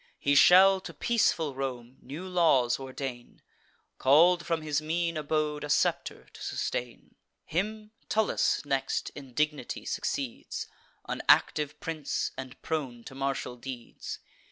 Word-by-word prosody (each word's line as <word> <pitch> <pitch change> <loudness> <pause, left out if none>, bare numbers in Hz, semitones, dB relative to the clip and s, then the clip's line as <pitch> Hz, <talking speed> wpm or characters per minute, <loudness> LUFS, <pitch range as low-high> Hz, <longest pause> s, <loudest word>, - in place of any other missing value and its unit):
He 140 - +1
shall 190 +6 +7
to - - -9
peaceful 170 - +1
Rome 130 -2 -5
new 155 +8 -7
laws 160 -10 +3
ordain, 130 -2 -7 0.6
Call'd 170 +5 +5
from 165 -2 0
his 150 -1 0
mean 165 +2 -1
abode 150 -1 -1
a 145 - -5
scepter 145 - 0
to - - -13
sustain. 120 -1 -4 0.3
Him 210 +5 -3 0.2
Tullus 215 -7 +1
next 135 -1 -1
in 135 -4 -11
dignity 150 -1 -1
succeeds, 135 -4 -3 0.4
An - - -3
active 150 -1 +4
prince, 155 -3 -2
and 130 0 -8
prone 130 -7 -3
to - - -10
martial 135 -2 -2
deeds. 120 -1 -7
150 Hz, 130 wpm, -29 LUFS, 135-165 Hz, 0.6 s, shall